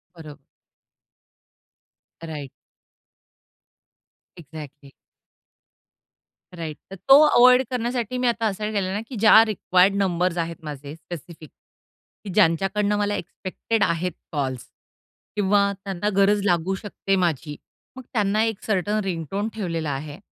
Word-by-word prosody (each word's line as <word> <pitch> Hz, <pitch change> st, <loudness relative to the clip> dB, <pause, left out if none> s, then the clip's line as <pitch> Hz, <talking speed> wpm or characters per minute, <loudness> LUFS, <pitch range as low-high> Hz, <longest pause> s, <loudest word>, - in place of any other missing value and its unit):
बरं. 155 Hz, -3 st, -11 dB, 1.9 s
Right. 150 Hz, -4 st, -6 dB, 1.9 s
Exactly. 150 Hz, -3 st, -11 dB, 1.7 s
Right. 160 Hz, -3 st, -5 dB
तर 195 Hz, -, -8 dB
तो 270 Hz, +9 st, +6 dB
अव्हॉइड 250 Hz, -1 st, +6 dB
करण्यासाठी 245 Hz, -1 st, -2 dB
मी 250 Hz, 0 st, 0 dB
आता 230 Hz, -1 st, 0 dB
असं 210 Hz, 0 st, -2 dB
केलं 195 Hz, -3 st, -1 dB
ना, 205 Hz, -, -2 dB
की 260 Hz, -, -8 dB
ज्या 220 Hz, +1 st, +7 dB
रिक्वायर्ड 195 Hz, -2 st, +2 dB
नंबर्स 180 Hz, -2 st, 0 dB
आहेत 165 Hz, 0 st, -2 dB
माझे 145 Hz, -1 st, -7 dB
स्पेसिफिक, 165 Hz, -1 st, -10 dB, 0.7 s
की 205 Hz, -, -7 dB
ज्यांच्याकडनं 200 Hz, +3 st, +2 dB
मला 205 Hz, 0 st, 0 dB
एक्सपेक्टेड 200 Hz, +5 st, -3 dB
आहेत 170 Hz, +1 st, 0 dB, 0.2 s
कॉल्स. 130 Hz, -5 st, -3 dB, 0.7 s
किंवा 200 Hz, 0 st, +2 dB
त्यांना 195 Hz, +1 st, -2 dB
गरज 200 Hz, +1 st, +3 dB
लागू 180 Hz, 0 st, +1 dB
शकते 195 Hz, 0 st, -2 dB
माझी. 165 Hz, -5 st, -1 dB, 0.4 s
मग 260 Hz, -, -9 dB
त्यांना 210 Hz, -1 st, +2 dB
एक 225 Hz, -2 st, -2 dB
सर्टन 210 Hz, +1 st, 0 dB
रिंगटोन 195 Hz, +3 st, -3 dB
ठेवलेला 165 Hz, -7 st, -3 dB
आहे. 145 Hz, +2 st, -6 dB
195 Hz, 115 wpm, -23 LUFS, 165-210 Hz, 1.9 s, ज्या